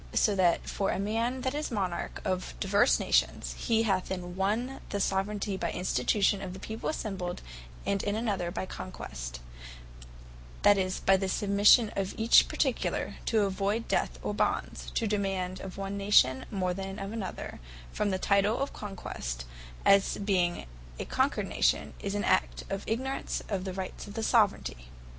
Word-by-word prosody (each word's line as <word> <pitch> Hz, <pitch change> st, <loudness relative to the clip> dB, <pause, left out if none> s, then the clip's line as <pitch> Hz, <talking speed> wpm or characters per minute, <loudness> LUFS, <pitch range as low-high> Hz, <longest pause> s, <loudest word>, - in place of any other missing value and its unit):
So 210 Hz, -, +4 dB
that 180 Hz, -3 st, +2 dB
for 195 Hz, -, -1 dB
a -, -, 0 dB
man 230 Hz, +6 st, -1 dB
that 260 Hz, +1 st, -1 dB
is 300 Hz, +1 st, -2 dB
Monarch 190 Hz, -6 st, -3 dB
of 185 Hz, -2 st, -2 dB
divers 200 Hz, +5 st, +3 dB
Nations, -, -, +1 dB
whereof -, -, -8 dB
he 225 Hz, -2 st, +3 dB
hath, 190 Hz, -4 st, 0 dB
in 180 Hz, -1 st, -4 dB
one 220 Hz, +8 st, -1 dB
the 205 Hz, -, -2 dB
Soveraignty 195 Hz, +1 st, 0 dB
by -, -, -1 dB
Institution 195 Hz, -, +1 dB
of 185 Hz, -2 st, -5 dB
the 190 Hz, -, -8 dB
people 220 Hz, +3 st, -4 dB
assembled, 190 Hz, -, -4 dB, 0.4 s
and 200 Hz, -1 st, +1 dB
in 205 Hz, 0 st, -1 dB
another 205 Hz, -6 st, -1 dB
by 185 Hz, -, -3 dB
Conquest, -, -, -7 dB, 1.2 s
that 205 Hz, -, +7 dB
is 185 Hz, 0 st, -1 dB
by 195 Hz, 0 st, +5 dB
the 190 Hz, 0 st, -2 dB
Submission 205 Hz, +3 st, +5 dB
of 195 Hz, -1 st, -2 dB
each 225 Hz, +1 st, +6 dB
particular, -, -, -1 dB
to 215 Hz, -3 st, +3 dB
avoyd 200 Hz, +4 st, -1 dB
death -, -, 0 dB
or -, -, -1 dB
bonds; -, -, -1 dB
to 230 Hz, -, +1 dB
demand 195 Hz, -3 st, -1 dB
of 190 Hz, -1 st, -8 dB
one 195 Hz, 0 st, -3 dB
Nation 165 Hz, -11 st, +4 dB
more 185 Hz, -3 st, -1 dB
than 195 Hz, +1 st, -5 dB
of 195 Hz, 0 st, -5 dB
the 225 Hz, -2 st, -3 dB
other, -, -, -6 dB, 0.3 s
from 210 Hz, -, 0 dB
the 190 Hz, -, 0 dB
title 200 Hz, +4 st, +2 dB
of 275 Hz, -, -2 dB
Conquest, 60 Hz, -, -5 dB, 0.4 s
as 200 Hz, 0 st, +5 dB
being 180 Hz, -, 0 dB, 0.3 s
a -, -, -4 dB
Conquered -, -, 0 dB
Nation, -, -, +1 dB
is 200 Hz, 0 st, -3 dB
an 205 Hz, -, 0 dB
act 185 Hz, -, +1 dB
of 195 Hz, 0 st, -2 dB
ignorance 260 Hz, +4 st, -2 dB
of 195 Hz, -3 st, -2 dB
the 190 Hz, -, -3 dB
Rights 190 Hz, +2 st, -6 dB
of 205 Hz, -, -9 dB
Soveraignty. 200 Hz, -, +1 dB
195 Hz, 170 wpm, -29 LUFS, 185-210 Hz, 1.2 s, that